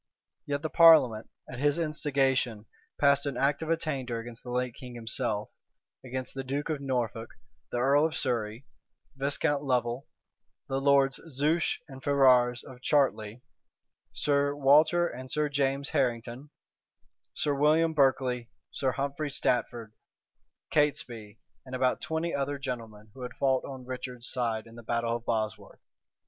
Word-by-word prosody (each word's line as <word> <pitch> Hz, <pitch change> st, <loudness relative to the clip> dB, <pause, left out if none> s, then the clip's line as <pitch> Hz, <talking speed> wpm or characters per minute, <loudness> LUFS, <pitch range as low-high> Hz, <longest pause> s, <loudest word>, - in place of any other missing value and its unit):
Yet 145 Hz, +1 st, -2 dB
the 155 Hz, -, -1 dB
parliament, 155 Hz, -10 st, +6 dB, 0.2 s
at 130 Hz, -, -8 dB
his 145 Hz, +2 st, +2 dB
instigation, 135 Hz, -8 st, 0 dB, 0.3 s
passed 140 Hz, 0 st, +3 dB
an 140 Hz, -, -3 dB
act 140 Hz, +2 st, +1 dB
of 160 Hz, -, -4 dB
attainder 140 Hz, -7 st, -1 dB
against 115 Hz, 0 st, -8 dB
the 125 Hz, -, -9 dB
late 125 Hz, 0 st, -1 dB
king 125 Hz, 0 st, -10 dB
himself, 115 Hz, -2 st, -2 dB, 0.5 s
against 130 Hz, 0 st, -4 dB
the 135 Hz, -, -4 dB
duke 140 Hz, +4 st, -3 dB
of 150 Hz, -2 st, -3 dB
Norfolk, 120 Hz, -4 st, -2 dB, 0.4 s
the -, -, -3 dB
earl 140 Hz, +5 st, +4 dB
of 160 Hz, -, -7 dB
Surrey, 120 Hz, -2 st, -2 dB, 0.5 s
Viscount 140 Hz, +1 st, 0 dB
Lovel, 125 Hz, -1 st, -1 dB, 0.6 s
the 135 Hz, 0 st, -2 dB
lords 140 Hz, -1 st, +3 dB
Zouche 150 Hz, +4 st, +1 dB
and 135 Hz, -2 st, -11 dB
Ferrars 125 Hz, -4 st, +4 dB
of 130 Hz, -3 st, -12 dB
Chartley, 125 Hz, -5 st, +1 dB, 0.7 s
Sir 140 Hz, +5 st, +1 dB
Walter 155 Hz, +5 st, +5 dB
and 130 Hz, -3 st, -8 dB
Sir 150 Hz, +2 st, 0 dB
James 140 Hz, 0 st, 0 dB
Harrington, 125 Hz, -1 st, -1 dB, 0.9 s
Sir 145 Hz, -, +1 dB
William 155 Hz, +3 st, +3 dB
Berkeley, 130 Hz, -4 st, +1 dB, 0.2 s
Sir 130 Hz, -2 st, -1 dB
Humphrey 140 Hz, +3 st, -2 dB
Stafford, 120 Hz, -4 st, -1 dB, 0.8 s
Catesby, 120 Hz, -8 st, -1 dB, 0.3 s
and 130 Hz, 0 st, -7 dB
about 130 Hz, 0 st, +1 dB
twenty 160 Hz, +1 st, -2 dB
other 140 Hz, +1 st, -1 dB
gentlemen 115 Hz, -6 st, -7 dB
who 130 Hz, -, -12 dB
had 125 Hz, -1 st, -6 dB
fought 130 Hz, -1 st, +1 dB
on 130 Hz, -2 st, -8 dB
Richard's 125 Hz, -1 st, -6 dB
side 115 Hz, -3 st, -1 dB
in 115 Hz, -, -15 dB
the 120 Hz, -, -10 dB
battle 115 Hz, 0 st, -1 dB
of 120 Hz, -, -16 dB
Bosworth. 110 Hz, -2 st, -3 dB
130 Hz, 145 wpm, -29 LUFS, 120-145 Hz, 0.9 s, parliament